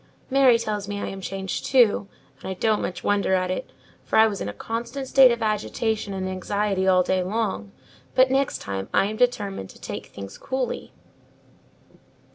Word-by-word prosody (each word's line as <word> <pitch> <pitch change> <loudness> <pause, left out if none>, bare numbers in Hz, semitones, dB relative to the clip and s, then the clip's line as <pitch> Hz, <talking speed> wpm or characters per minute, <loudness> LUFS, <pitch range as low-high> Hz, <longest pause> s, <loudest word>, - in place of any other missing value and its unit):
"Mary 265 -3 +6
tells 210 -3 -3
me 205 0 -4
I - - -3
am 195 - -7
changed 190 0 -4
too; 235 -6 +4 0.3
and - - -7
I 190 - -3
don't 215 +3 +1
much 180 - -4
wonder 200 -2 +2
at 185 0 0
it, 185 - -4 0.3
for - - 0
I 220 - +8
was 205 -3 -2
in - - -2
a - - -3
constant 235 - -5
state 265 -1 +7
of 235 -1 -1
agitation 215 0 -1
and 190 -1 -3
anxiety 190 +1 -1
all 185 -1 +5
day 185 +1 +1
long: 210 +1 -2 0.4
but 260 0 +5
next 270 0 +1
time 95 -1 -4
I - - +4
am 210 +2 -3
determined 205 - 0
to - - -15
take - - -6
things 100 0 -10
coolly." 260 -2 -3
205 Hz, 185 wpm, -24 LUFS, 190-235 Hz, 0.4 s, I